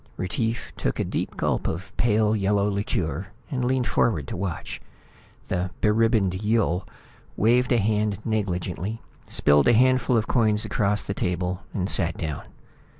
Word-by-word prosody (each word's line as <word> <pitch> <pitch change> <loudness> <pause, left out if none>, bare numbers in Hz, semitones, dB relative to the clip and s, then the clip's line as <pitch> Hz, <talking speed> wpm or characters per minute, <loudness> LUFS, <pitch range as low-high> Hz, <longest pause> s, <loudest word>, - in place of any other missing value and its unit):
Retief 110 +5 -2
took - - -2
a - - +2
deep - - -3
gulp - - 0
of 90 +4 -4
a - - -3
pale 110 -2 +3
yellow 100 0 +1
liqueur 95 -4 -2 0.2
and 130 -3 -1
leaned 125 0 +1
forward 80 - +1
to - - -4
watch. 90 -2 -4 0.7
The 90 0 -1
beribboned 105 -3 +2
Yill 105 -4 +1 0.5
waved 125 +4 +3
a 120 - +4
hand 105 -1 +1
negligently, 100 0 -2 0.2
spilled 75 0 +3
a 120 - +6
handful 130 +1 +3
of 110 - +1
coins 110 -3 +2
across 105 -1 +1
the 100 - -3
table 90 0 -2
and 95 -2 -2
sat 85 -4 +2
down. 75 -4 -4
105 Hz, 150 wpm, -25 LUFS, 90-115 Hz, 0.7 s, a